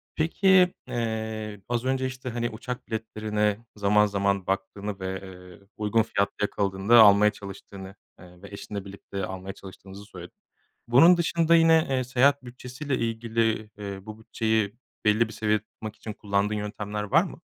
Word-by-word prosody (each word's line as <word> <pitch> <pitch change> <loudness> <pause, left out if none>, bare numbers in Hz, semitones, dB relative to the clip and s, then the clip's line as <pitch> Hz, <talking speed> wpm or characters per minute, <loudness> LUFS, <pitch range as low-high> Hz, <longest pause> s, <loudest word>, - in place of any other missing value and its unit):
Peki, 180 +3 +4
eee, 110 -3 -4
az 120 0 -1
önce, 130 0 0
işte, 130 0 -5
hani, 120 0 -2
uçak 125 +3 -7
biletlerine 110 -1 -2
zaman 105 0 +3
zaman 100 -2 0
baktığını 100 +1 -3
ve, 95 0 -4
eee, 90 0 -13
uygun 110 +1 +2
fiyatlı 100 -2 -1
yakaladığında 100 +2 +3
almaya 105 0 +7
çalıştığını, 100 -1 -10 0.2
eee, 90 0 -16
ve 100 - -11
eşinle 100 0 -7
birlikte 100 0 -6
almaya 95 +1 -7
çalıştığınızı 95 +1 -12
söyledin. 90 -4 -12 0.5
Bunun 165 +9 +7
dışında 170 -1 +2
yine, 165 -1 +5
eee, 130 -1 +1
seyahat 130 +2 +2
bütçesiyle 125 +3 -5
ilgili, 115 -1 -1
eee, 100 -1 -6
bu 110 +2 -10
bütçeyi 110 -1 -1 0.3
belli 110 +2 +3
bir - - -10
seviyede 105 -1 0
tutmak 110 0 -9
için 110 - -7
kullandığın 100 +1 -1
yöntemler 105 0 -4
var 100 - +4
mı? - - -9
105 Hz, 150 wpm, -26 LUFS, 100-120 Hz, 0.5 s, almaya